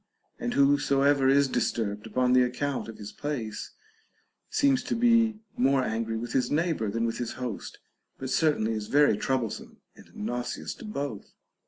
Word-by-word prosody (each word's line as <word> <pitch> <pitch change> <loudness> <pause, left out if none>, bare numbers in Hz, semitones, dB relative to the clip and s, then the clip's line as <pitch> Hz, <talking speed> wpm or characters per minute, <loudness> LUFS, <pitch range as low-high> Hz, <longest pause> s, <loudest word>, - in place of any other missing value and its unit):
And 245 0 -2
whosoever 140 -1 +4
is 140 +1 +5
disturbed 110 -4 -1
upon 125 +3 +2
the 130 - +6
account 130 +2 -1
of 115 - -9
his 105 -1 -8
place 120 -8 -4 0.8
seems 275 -2 +3
to - - -1
be 230 -2 +3
more 135 +1 +3
angry 115 -1 -2
with 120 +2 -5
his 125 -2 +1
neighbor 155 - 0
than 115 +3 -1
with 115 - -2
his 120 -2 -3
host, 125 -4 -6 0.4
but 130 0 -5
certainly 145 -9 +2
is 105 -1 -4
very 145 -5 +4
trouble 125 0 -1
some - - -9 0.2
and - - -17
nauseous 120 +3 -4
to - - -11
both. 140 - -5
130 Hz, 165 wpm, -28 LUFS, 115-145 Hz, 0.8 s, the